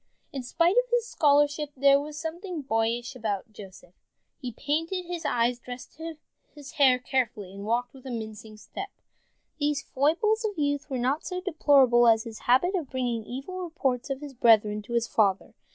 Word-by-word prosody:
In 270 - -3
spite 335 - +1
of - - +3
his 480 -1 +1
scholarship 295 -5 +2
there 275 +1 +5
was 300 +1 -8
something 340 0 -5
boyish 235 +1 -1
about 215 -3 -4
Joseph. 190 -3 -13 0.5
He 250 -4 -5
painted 325 - -2
his 345 -2 -5
eyes, 240 +1 +1
dressed 250 +5 -10 0.6
his 290 -2 -10
hair 265 -3 +5
carefully, 240 -7 -2
and 200 +1 -8
walked 240 +2 0
with 265 -1 -12
a - - -5
mincing 220 -2 -7
step. 390 - -7 0.7
These 290 -1 0
foibles 425 - +1
of 415 -4 -2
youth 285 0 -1
were 265 - -2
not 260 +5 0
so 365 0 -4
deplorable 280 - +4
as 225 -1 +5
his 225 -1 -9
habit 305 +10 +4
of 335 -8 -2
bringing 245 -3 -2
evil 275 - -6
reports 280 -8 -2
of 270 0 -3
his 290 -2 -8
brethren 215 -4 +4
to 235 - -6
his 235 -1 +1
father. 195 -3 +1
265 Hz, 175 wpm, -27 LUFS, 235-310 Hz, 0.7 s, there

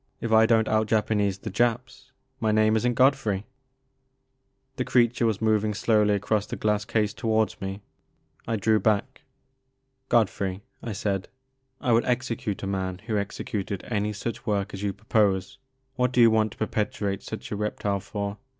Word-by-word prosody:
If 115 - -3
I 110 0 +6
don't 110 -1 +3
out 110 0 +2
Japanese 105 -3 +1
the - - -7
Japs 125 +2 -1 0.3
my 110 -3 +1
name 110 0 +3
is 110 - +1
n*t 120 - 0
Godfrey.*' 125 -7 +2 1.3
Hie 130 - -1
creature 120 -1 +2
was 110 -1 -1
moving 110 -1 +2
slowly 105 -1 +3
across 105 +1 0
the - - -4
glass 105 -1 0
case 105 -2 0
towards 110 -1 0
me. 95 +1 -5 0.6
I 115 - 0
drew 110 +1 +2
back. 110 +6 0 0.9
Godfrey," 100 -4 +1 0.2
I 115 - -4
said, 100 -1 -2 0.5
I 125 - 0
would 115 +1 +4
execute 120 -5 -2
a - - -1
man 95 -2 -2
who 110 -2 -2
executed 100 -1 -4
any 105 -1 0
such 115 +4 -5
work 100 -2 -1
as 95 - -6
you 100 -1 0
propose. 100 0 0 0.4
What 125 -1 +2
do 125 - 0
you 115 -1 +7
want 110 -1 +2
to - - -21
perpetuate 105 -2 -2
such 110 - -7
a - - -1
reptile 105 -1 -1
for 100 0 -5
110 Hz, 170 wpm, -26 LUFS, 100-115 Hz, 1.3 s, you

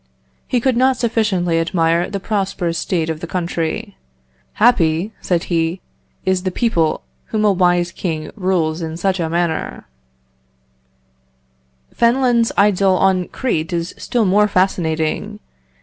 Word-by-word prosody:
He 250 - +1
could 255 +1 +1
not 260 +1 +3
sufficiently 210 -8 +1
admire 165 0 +1
the 200 0 -3
prosperous 190 -4 -2
state 165 -4 -1
of 160 -1 -3
the 170 - -6
country. 180 +4 -3 0.6
'Happy,' 200 -4 +2
said 175 -2 0
he, 165 +1 -1 0.5
'is 190 -1 +1
the 185 - -1
people 175 -6 0 0.2
whom 215 -1 -1
a 205 - +5
wise 175 -2 +2
king 160 -4 -4
rules 180 -5 0
in 160 0 -4
such 190 +1 0
a 165 -2 -1
manner.'" 170 -1 -2 2.1
Fenelon's 235 -1 +2
idyl 195 -2 +4
on 185 -2 +2
Crete 165 -11 -2
is 170 0 -2
still 235 -3 -1
more 205 +2 +4
fascinating. 165 -5 -1
180 Hz, 130 wpm, -18 LUFS, 165-210 Hz, 2.1 s, a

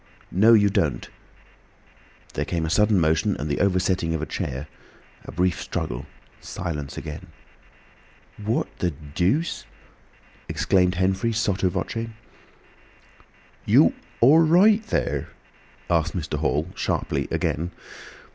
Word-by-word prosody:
no, 110 +5 +5
you 105 -2 +6
don't!" 100 - -1 1.2
There - - -1
came 85 -2 -2
a 80 - -2
sudden 105 -1 +4
motion 80 +5 +1
and 75 - -4
the 75 - -1
oversetting 95 -3 +1
of 80 - -3
a - - -1
chair, 65 0 -4 0.6
a - - -8
brief 90 +1 0
struggle. 60 +4 -4 0.3
Silence 75 -6 -5
again. 75 -2 -7 1.2
"What 110 +3 0
the 90 - +1 0.2
dooce?" 100 - 0 0.9
exclaimed 90 -1 +2
Henfrey, 95 +5 +1
sotto 95 -4 +1
voce. 115 +5 -3 1.6
"You—all—right 165 - +4
thur?" 210 - -1 0.6
asked 85 +1 +1
Mr. 75 -3 -3
Hall, 75 +2 0
sharply, - - -2
again. 85 +4 -1
90 Hz, 110 wpm, -24 LUFS, 80-105 Hz, 1.6 s, you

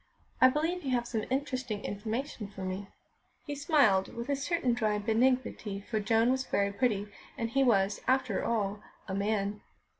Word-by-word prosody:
"I 255 - +10
believe 325 +6 -1
you 275 - -4
have 240 -1 -1
some 225 -3 -2
interesting 260 -5 -2
information 220 +3 -3
for 195 -1 -8
me." 185 +2 -4 0.6
He 290 - -4
smiled 280 - +3
with 235 +3 -5
a 280 - +2
certain 280 -2 0
dry 215 -3 +1
benignity, 225 -1 +1
for 215 +2 -2
Joan 225 +3 +3
was 260 0 +1
very 200 -5 0
pretty, 210 -2 +1 0.3
and 230 -3 -2
he 275 +2 +3
was, 200 -5 +2
after 255 -6 +1
all, 210 -3 -1 0.3
a 190 - -4
man. 205 +1 -1
230 Hz, 170 wpm, -30 LUFS, 205-260 Hz, 0.6 s, I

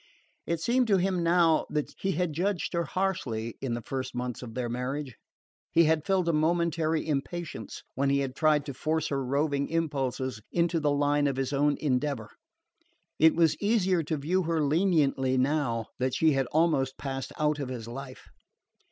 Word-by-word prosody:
It 170 -1 0
seemed 245 +7 +2
to 200 -3 +4
him 185 -1 0
now 170 -1 +3
that 150 -1 -2
he 195 - 0
had 175 -1 -1
judged 180 +3 -1
her 170 -1 0
harshly 125 - -2
in 125 -3 -2
the 120 - -6
first 130 -1 -4
months 125 -1 -3
of 115 -3 -8
their 125 -1 -2
marriage. 130 +2 -4 0.6
He 170 0 +5
had 160 0 +1
felt 190 -3 +2
a 170 - +2
momentary 160 0 +1
impatience 155 - -4
when 140 +1 +1
he 140 0 +2
had 135 -1 -3
tried 150 -2 +3
to 140 - -5
force 155 +4 -1
her 135 -1 -1
roving 140 +2 0
impulses 135 -7 -2
into 170 -1 +1
the 150 -1 +1
line 145 0 +2
of 140 - -1
his 135 +1 -1
own 145 +1 +2
endeavour: 130 -5 -1 0.9
it 160 +1 +6
was 165 -2 +4
easier 195 -5 +2
to 155 0 -2
view 170 +7 0
her 165 -2 0
leniently 145 -5 +2
now 130 -4 +1
that 130 0 0
she 160 -1 +4
had 135 -2 +1
almost 150 -4 +1
passed 135 -1 -4
out 150 -1 +1
of 135 -3 -3
his 120 -3 -6
life. 130 +2 -8
150 Hz, 180 wpm, -28 LUFS, 135-165 Hz, 0.9 s, it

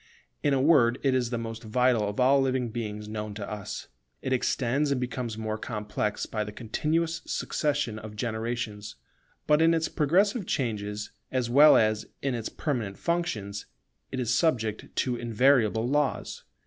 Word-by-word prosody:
In 145 - +2
a - - +2
word 130 -5 +5
it 135 -2 +3
is 125 -2 +1
the 120 - -2
most 115 -1 -5
vital 115 -1 +2
of 105 - -5
all 135 +2 +5
living 130 -2 0
beings 105 -2 -5
known 105 -1 -5
to 100 -1 -5
us. 105 -2 -6 0.4
It 130 - 0
extends 130 +3 +1
and 140 -2 +1
becomes 120 -2 -3
more 110 -1 -3
complex 105 -1 -3
by 110 -1 -2
the 105 - -6
continuous 160 +10 -1
successions 145 -8 -1
of 110 -1 -9
generations. 110 -1 -3 0.5
But 150 +1 +4
in 165 +1 +5
its 160 0 0
progressive 195 - +2
changes 105 -4 -2 0.2
as 125 -2 -1
well 145 +4 +8
as 110 -1 +1 0.2
in 135 -2 0
its 115 -2 -3
permanent 115 -10 -3
functions, 110 - -2 0.4
it 130 - -3
is 120 -1 0
subject 115 -8 +1
to 125 -2 0
invariable 115 -1 +3
laws. 145 +1 -1
120 Hz, 160 wpm, -28 LUFS, 110-140 Hz, 0.5 s, well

